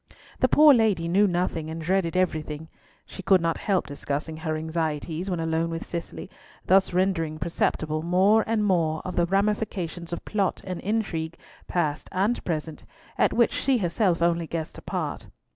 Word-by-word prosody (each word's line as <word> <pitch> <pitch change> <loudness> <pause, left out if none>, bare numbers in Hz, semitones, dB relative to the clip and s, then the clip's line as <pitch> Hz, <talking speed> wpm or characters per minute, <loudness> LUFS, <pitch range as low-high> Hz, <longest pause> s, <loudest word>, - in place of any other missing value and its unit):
The - - +4
poor 300 -1 +7
lady 215 -8 +2
knew 200 +4 +4
nothing, 175 -3 -1
and 160 +1 -5
dreaded 180 +1 0
everything. 155 -3 -1 0.4
She - - -9
could 190 0 +4
not 165 -1 -1
help 195 -4 0
discussing 145 +2 -4
her 155 0 -2
anxieties 160 +2 -3
when 175 -2 -1
alone 165 0 0
with 165 0 -4
Cicely, 85 - -6 0.4
thus 190 +1 +4
rendering 180 -4 0
perceptible 155 -1 -1
more 190 +6 +4
and 220 -2 +1
more 165 -5 +1
of 185 - -4
the 175 0 +2
ramifications 195 -3 -1
of 170 - -5
plot 200 -4 0
and 185 -2 -5
intrigue—past 165 -5 -3
and 200 +6 0
present—at 165 - -3
which 235 -1 +3
she 270 -2 +1
herself 175 -3 +1
only 170 -1 +1
guessed 160 -1 -5
a - - -15
part. - - -4
170 Hz, 160 wpm, -26 LUFS, 160-195 Hz, 0.4 s, poor